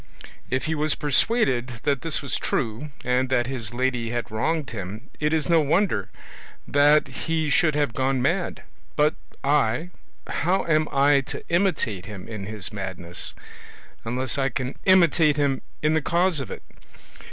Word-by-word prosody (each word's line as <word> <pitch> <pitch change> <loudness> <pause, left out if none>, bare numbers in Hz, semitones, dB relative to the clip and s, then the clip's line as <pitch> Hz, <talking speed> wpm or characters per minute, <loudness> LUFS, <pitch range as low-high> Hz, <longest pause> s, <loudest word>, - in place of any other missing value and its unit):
If 130 0 -1
he 160 - 0
was 155 -1 +1
persuaded 135 - +2
that 140 -3 +1
this 160 -1 0
was 140 - -2
true, 120 +5 -2
and 125 +1 +1
that 120 -2 +2
his 120 -4 -4
lady 125 -1 -1
had 120 -1 -3
wronged 150 +7 -1
him, 105 +4 -7
it 150 0 +1
is 155 -3 +1
no 165 -1 +5
wonder 155 - +1 0.6
that 145 +1 +4
he 155 +3 -2
should 155 +2 +3
have 145 -5 +1
gone 130 +1 +1
mad; 170 +8 -1 0.3
but 150 0 +3 0.3
I, 150 +4 +1 0.3
how 185 +3 0
am 155 -2 +2
I 140 0 +4
to - - -6
imitate 170 - 0
him 100 -4 -8
in 105 -4 -6
his 105 -3 -5
madness, 95 -3 -5 0.7
unless 125 +4 -2
I 135 0 +2
can 130 0 -3
imitate 170 -5 +5
him 140 -2 +1 0.2
in 155 +1 +3
the 160 - +2
cause 170 +1 +2
of 135 - -5
it? - - -7
140 Hz, 160 wpm, -24 LUFS, 120-155 Hz, 0.7 s, no